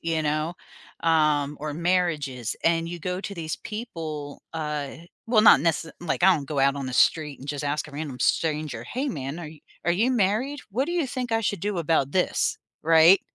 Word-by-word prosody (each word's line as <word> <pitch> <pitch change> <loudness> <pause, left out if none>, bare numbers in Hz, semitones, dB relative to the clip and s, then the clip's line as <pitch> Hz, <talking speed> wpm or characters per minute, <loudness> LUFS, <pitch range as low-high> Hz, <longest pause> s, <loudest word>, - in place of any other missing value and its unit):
you 165 -1 -1
know, 155 +3 -1 0.5
um, 150 -3 +2
or 150 -1 -4
marriages, 155 -8 0
and 165 0 +2
you 175 0 -5
go 180 +2 -3
to 200 - -6
these 160 -2 -4
people, 160 -10 -6
uh, 150 -3 -3 0.4
well, 225 -2 +4
not 205 - +8
nece 165 0 0
like 175 0 -2
I 190 -1 +7
don't 140 -4 -4
go 145 -1 -3
out 140 +1 +3
on 135 -2 -4
the 130 - -4
street 150 +1 +2
and 140 - -10
just 145 0 -3
ask 145 +1 -1
a - - -11
random 140 -3 -6
stranger, 150 -7 0
"Hey, 265 - -3
man, 140 - -4
are 165 -3 -6
you, 155 -1 -14 0.2
are 175 - +3
you 225 +8 +2
married? 245 +6 +1
What 260 +8 0
do 345 - -3
you 340 -6 +1
think 250 -2 -4
I 225 - +2
should 205 -4 -1
do 205 -3 -2
about 155 -4 +1
this?" 185 - +1 0.3
Right? 165 +4 +7
160 Hz, 205 wpm, -25 LUFS, 150-190 Hz, 0.5 s, not